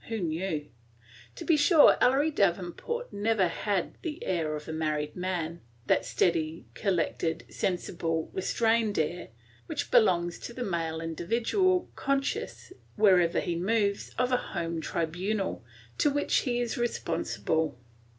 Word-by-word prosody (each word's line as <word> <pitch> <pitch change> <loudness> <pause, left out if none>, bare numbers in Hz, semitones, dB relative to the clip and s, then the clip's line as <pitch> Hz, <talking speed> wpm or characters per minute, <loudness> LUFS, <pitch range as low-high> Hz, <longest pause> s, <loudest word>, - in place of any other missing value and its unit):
Who 225 - -2
knew? 160 -3 -2 0.7
To - - -7
be 330 - +4
sure, 300 +1 +7
Ellery 275 +5 +4
Davenport 200 - -1
never 205 -2 +2
had 190 +2 -2
the 320 -1 -5
air 160 -4 0
of 150 - -8
a 160 - -4
married 150 -1 -2
man, 175 -2 -3
– 120 0 -32
that - - +2
steady, 165 -2 0
collected, 170 -4 -1
sensible, 170 -3 -2
restrained 225 +2 +1
air 170 0 -1 0.4
which - - -3
belongs 175 -5 +3
to 235 - -7
the 250 - -4
male 165 -5 -2
individual, 230 - +1
conscious, 275 +6 -2 0.2
wherever 185 -5 +4
he 175 - -2
moves, 200 +3 0
of 250 +1 +1
a 250 - +4
home 170 -6 -3
tribunal, 180 - -2 0.4
to 295 - +4
which 290 +1 +1
he 245 -3 0
is 240 -1 -2
responsible. 160 - -1
185 Hz, 135 wpm, -29 LUFS, 165-230 Hz, 0.7 s, sure